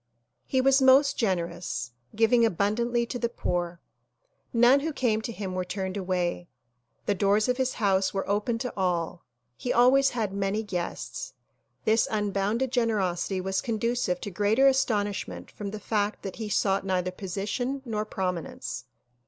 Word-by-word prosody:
He 260 - +2
was 270 +1 +4
most 270 +2 +6
generous, 170 - -2 0.2
giving 230 +2 +4
abundantly 230 +4 +1
to 245 +1 -5
the 235 - 0
poor. 175 -6 -2 0.7
None 245 +3 +6
who 315 +3 -2
came 230 -6 +1
to 230 - -4
him 195 -4 -5
were 185 0 -1
turned 190 +1 -4
away. 180 -2 -1 0.6
The 205 - +2
doors 200 +3 +2
of 250 0 +1
his 260 -1 0
house 195 -3 +2
were 195 - -3
open 210 +3 0
to 250 - -3
all. 175 -3 -1 0.3
He 245 - -3
always 270 +3 +5
had 210 -4 -1
many 200 +2 -1
guests. 210 - -4 0.5
This 220 +1 +3
unbounded 210 +4 0
gen 240 -3 +2
erosity 185 -2 -1
was 190 0 0
conducive 230 -5 -1
to 205 - -5
greater 210 +7 +3
astonishment 205 - 0
from 205 -1 -6
the 215 +1 -6
fact 210 -1 -1
that 195 - -6
he 220 -2 -4
sought 195 -1 +1
neither 185 -1 0
position 210 +8 -3
nor 215 -3 -1
prominence. 180 -9 -4
210 Hz, 155 wpm, -27 LUFS, 190-235 Hz, 0.7 s, most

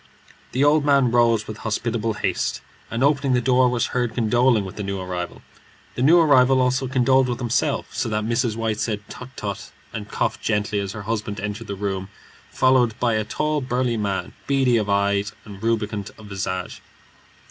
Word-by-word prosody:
The 130 - +2
old 150 +1 +4
man 140 -4 +3
rose 115 -3 +3
with 110 - -6
hospitable 115 +1 -2
haste, - - -1 0.3
and 115 - -1
opening 140 -2 +2
the 125 - +3
door, 125 0 +3
was 120 -1 0
heard 120 -2 -1
condoling 120 -1 +3
with 95 - -8
the - - -5
new 100 -1 -3
arrival. 90 -1 -5 0.5
The - - -4
new 155 +7 +6
arrival 135 -4 +5
also 130 +1 +1
condoled 130 0 +3
with 120 - -1
himself, 120 -2 -1
so - - -1
that 105 0 -1
Mrs. 115 -1 0
White 110 -2 -2
said, 105 -3 -3
"Tut, 125 - -9
tut!" 100 -1 -5 0.2
and 105 -1 -6
coughed - - -1
gently 105 -1 0
as 100 -1 -4
her 105 -2 -7
husband 105 -2 -3
entered 105 +3 -5
the 100 - -4
room, 95 -1 -3 0.4
followed 130 -3 +2
by 120 -2 +2
a 110 0 +1
tall, 150 +7 -1
burly 125 -1 0
man, 100 -3 -2
beady 135 -3 +3
of 105 -2 -1
eye 100 0 +2 0.2
and 100 -2 -11
rubicund 110 -3 -1
of 110 - -13
visage. 95 -2 -4
115 Hz, 185 wpm, -23 LUFS, 105-125 Hz, 0.5 s, new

